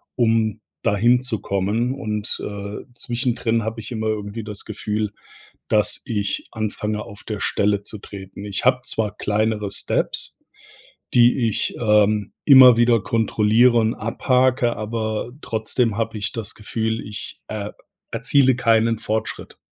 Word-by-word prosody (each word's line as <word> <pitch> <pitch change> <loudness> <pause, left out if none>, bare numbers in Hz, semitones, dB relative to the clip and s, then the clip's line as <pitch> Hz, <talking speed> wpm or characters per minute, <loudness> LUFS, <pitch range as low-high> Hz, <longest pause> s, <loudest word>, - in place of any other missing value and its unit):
um 110 -3 +1 0.2
dahin 120 +5 +3
zu 125 -5 -3
kommen 105 +7 -1
und, 105 -4 -3
äh, 100 0 -6
zwischendrin 120 -2 -1
habe 110 +1 -4
ich 110 - -10
immer 110 -2 -2
irgendwie 105 +1 -3
das 105 -1 -7
Gefühl, 105 0 -3 0.6
dass 105 -1 +2
ich 100 -4 -2
anfange 105 -1 -3
auf 100 +1 -12
der 105 -2 -5
Stelle 100 0 +1
zu 105 - -7
treten. 100 -1 -10
Ich 100 +3 -3
habe 125 0 +4
zwar 105 -2 -2
kleinere 105 -1 -1
Steps, - - -1 0.8
die 120 0 +5
ich, 105 - -1
ähm, 105 -1 +3
immer 130 -4 +9
wieder 120 -1 +4
kontrolliere 115 +2 +3
und 110 0 +2
abhake, 125 +1 +1
aber 110 +1 -3
trotzdem 110 0 -1
habe 115 -1 -2
ich 100 - -3
das 115 -3 -5
Gefühl, 110 +1 -2
ich, 105 0 -8
äh, 105 -1 -4 0.4
erziele 135 -2 +4
keinen 115 -2 +2
Fortschritt. 110 +1 -4
110 Hz, 135 wpm, -22 LUFS, 105-115 Hz, 0.8 s, immer